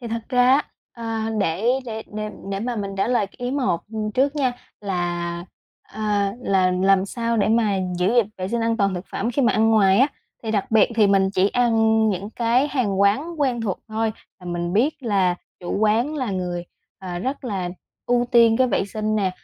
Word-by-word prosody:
Thì 235 Hz, -, -6 dB
thật 230 Hz, 0 st, -3 dB
ra 250 Hz, -1 st, +3 dB
á, -, -, +1 dB, 0.3 s
ờ, 225 Hz, -1 st, -3 dB
để 185 Hz, +2 st, -1 dB, 0.2 s
để 220 Hz, -1 st, -5 dB
để 215 Hz, 0 st, -3 dB, 0.2 s
để 195 Hz, 0 st, -2 dB
mà 240 Hz, +2 st, -3 dB
mình 200 Hz, -2 st, -3 dB
trả 195 Hz, -, 0 dB
lời 240 Hz, -5 st, +2 dB
cái 195 Hz, -, -24 dB
ý 245 Hz, 0 st, -3 dB
một, 255 Hz, -11 st, 0 dB
ừm, 215 Hz, -1 st, -2 dB
trước 275 Hz, +5 st, +1 dB
nha, 260 Hz, -3 st, +1 dB, 0.3 s
là 175 Hz, -3 st, -3 dB, 0.4 s
ờ, 215 Hz, -, -10 dB, 0.4 s
là 185 Hz, -2 st, +2 dB
làm 190 Hz, +1 st, +3 dB
sao 230 Hz, +1 st, -2 dB
để 210 Hz, -, +2 dB
mà 220 Hz, -3 st, +2 dB, 0.2 s
giữ 185 Hz, +6 st, +2 dB
gìn 240 Hz, -4 st, +4 dB
vệ 185 Hz, 0 st, -3 dB
sinh 235 Hz, +1 st, -1 dB
an 230 Hz, 0 st, +1 dB
toàn 200 Hz, -3 st, +1 dB
thực 180 Hz, +1 st, -6 dB
phẩm 235 Hz, -, -1 dB
khi 275 Hz, +3 st, 0 dB
mà 235 Hz, -, +3 dB
ăn 220 Hz, +1 st, +3 dB
ngoài 200 Hz, -3 st, +4 dB
á? 265 Hz, -, +6 dB, 0.4 s
Thì 220 Hz, -, -3 dB
đặc 205 Hz, -3 st, -1 dB
biệt 220 Hz, -2 st, +5 dB
thì 215 Hz, -2 st, +4 dB
mình 195 Hz, -1 st, +3 dB
chỉ 195 Hz, +1 st, +2 dB
ăn 225 Hz, -2 st, +3 dB
những 200 Hz, +1 st, -3 dB
cái 240 Hz, +5 st, +1 dB
hàng 225 Hz, -8 st, 0 dB
quán 285 Hz, +12 st, +1 dB
quen 255 Hz, -4 st, +1 dB
thuộc 205 Hz, -5 st, -2 dB
thôi, 220 Hz, 0 st, -1 dB, 0.3 s
là 180 Hz, -, -11 dB
mình 175 Hz, 0 st, -3 dB
biết 270 Hz, +8 st, +1 dB
là 195 Hz, -6 st, +2 dB, 0.3 s
chủ 175 Hz, -, -3 dB
quán 220 Hz, +7 st, +2 dB
là 255 Hz, -7 st, -2 dB
người, 180 Hz, -2 st, -3 dB, 0.3 s
à, 180 Hz, -2 st, -5 dB
rất 265 Hz, +7 st, -4 dB
là 195 Hz, -7 st, -2 dB, 0.4 s
ưu 245 Hz, 0 st, +2 dB
tiên 230 Hz, -2 st, +6 dB
cái 260 Hz, -, +3 dB
vệ -, -, +1 dB
sinh 215 Hz, +2 st, -2 dB
nè, 195 Hz, -3 st, +1 dB
220 Hz, 215 wpm, -22 LUFS, 195-235 Hz, 0.4 s, á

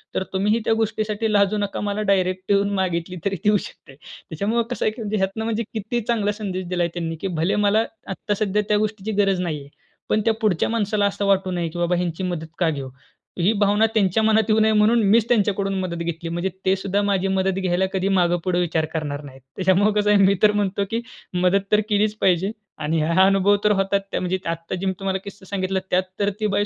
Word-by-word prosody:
तर -, -, 0 dB
तुम्हीही 210 Hz, +4 st, +2 dB
त्या -, -, +3 dB
गोष्टीसाठी 215 Hz, 0 st, -1 dB
लाजू 205 Hz, 0 st, +3 dB
नका, 205 Hz, -1 st, -2 dB
मला 205 Hz, 0 st, -2 dB
डायरेक्ट 185 Hz, 0 st, 0 dB
येऊन 200 Hz, 0 st, +3 dB
मागितली 180 Hz, 0 st, -2 dB
तरी 195 Hz, -1 st, 0 dB
देऊ 210 Hz, 0 st, +4 dB
शकते." 135 Hz, -7 st, -11 dB
त्याच्यामुळे 205 Hz, +11 st, -3 dB
कसं 245 Hz, -, -2 dB
आहे 215 Hz, -, +2 dB
की 215 Hz, 0 st, -2 dB
ह्यातून 195 Hz, +3 st, -1 dB
म्हणजे 225 Hz, 0 st, -1 dB
किती 220 Hz, +2 st, -2 dB
चांगला 220 Hz, -3 st, +1 dB
संदेश 185 Hz, -3 st, -3 dB
दिला 180 Hz, -1 st, 0 dB
आहे 170 Hz, -, 0 dB
त्यांनी 165 Hz, -2 st, -3 dB
की 195 Hz, -, -1 dB
भले 170 Hz, +4 st, +1 dB
मला 215 Hz, +3 st, +3 dB, 0.2 s
आता 195 Hz, +2 st, -3 dB
सध्या 210 Hz, 0 st, +1 dB
त्या 210 Hz, -, +4 dB
गोष्टीची 215 Hz, 0 st, -2 dB
गरज 195 Hz, -2 st, +1 dB
नाहीये, 150 Hz, -5 st, -4 dB, 0.4 s
पण 215 Hz, -, +2 dB
त्या 225 Hz, -, +4 dB
पुढच्या 200 Hz, -7 st, +1 dB
माणसाला 210 Hz, -2 st, 0 dB
असं 200 Hz, 0 st, -1 dB
वाटू 190 Hz, -1 st, +2 dB
नये 175 Hz, -2 st, -1 dB
की 175 Hz, +2 st, -7 dB
बाबा 175 Hz, +1 st, +1 dB
ह्यांची 175 Hz, 0 st, -2 dB
मदत 175 Hz, -3 st, -3 dB
का 170 Hz, -3 st, +3 dB
घेऊ? 140 Hz, -4 st, -4 dB, 0.5 s
ही 180 Hz, +5 st, +3 dB
भावना 205 Hz, +1 st, +4 dB
त्यांच्या 205 Hz, -1 st, +2 dB
मनात 220 Hz, 0 st, +3 dB
येऊ 215 Hz, 0 st, +4 dB
नये 220 Hz, 0 st, +4 dB
म्हणून 215 Hz, +2 st, +4 dB
मीच 225 Hz, +2 st, +4 dB
त्यांच्याकडून 200 Hz, -4 st, +1 dB
मदत 185 Hz, -2 st, -3 dB
घेतली, 165 Hz, 0 st, -4 dB
म्हणजे 175 Hz, +3 st, -2 dB, 0.2 s
ते 190 Hz, 0 st, +4 dB
सुद्धा 195 Hz, +1 st, -1 dB
माझी 195 Hz, -2 st, +1 dB
मदत 190 Hz, 0 st, 0 dB
घ्यायला 185 Hz, 0 st, +1 dB
कधी 190 Hz, 0 st, 0 dB
मागे-पुढे 175 Hz, -1 st, +1 dB
विचार 165 Hz, -2 st, 0 dB
करणार 150 Hz, -3 st, -3 dB
नाहीत. 135 Hz, -2 st, -12 dB
त्याच्यामुळे 190 Hz, +3 st, +3 dB
कसं 210 Hz, 0 st, +1 dB
आहे, 210 Hz, -1 st, +5 dB
मी 195 Hz, +1 st, +4 dB
तर 210 Hz, -, +7 dB
म्हणतो 200 Hz, -1 st, 0 dB
की 230 Hz, +1 st, -1 dB, 0.3 s
मदत 180 Hz, +2 st, +2 dB
तर 210 Hz, -, +5 dB
केलीच 210 Hz, 0 st, +2 dB
पाहिजे. 185 Hz, +2 st, +2 dB, 0.3 s
आणि 155 Hz, +1 st, -1 dB
हा 170 Hz, +4 st, +4 dB
अनुभव 195 Hz, +1 st, +4 dB
तर 210 Hz, -, +4 dB
होतात, 195 Hz, +1 st, +1 dB
त्या -, -, -1 dB
म्हणजे 185 Hz, +1 st, -1 dB
आता 165 Hz, +2 st, -4 dB
जे 185 Hz, +1 st, -4 dB
मी 190 Hz, -, +1 dB
तुम्हाला 190 Hz, -1 st, -1 dB
किस्सा 200 Hz, -1 st, -11 dB
सांगितला, 190 Hz, -1 st, -1 dB
त्यात 185 Hz, +1 st, +2 dB, 0.2 s
तर 200 Hz, 0 st, +2 dB
ती 215 Hz, -, +1 dB
बाई 205 Hz, 0 st, +2 dB
195 Hz, 220 wpm, -22 LUFS, 180-210 Hz, 0.5 s, तर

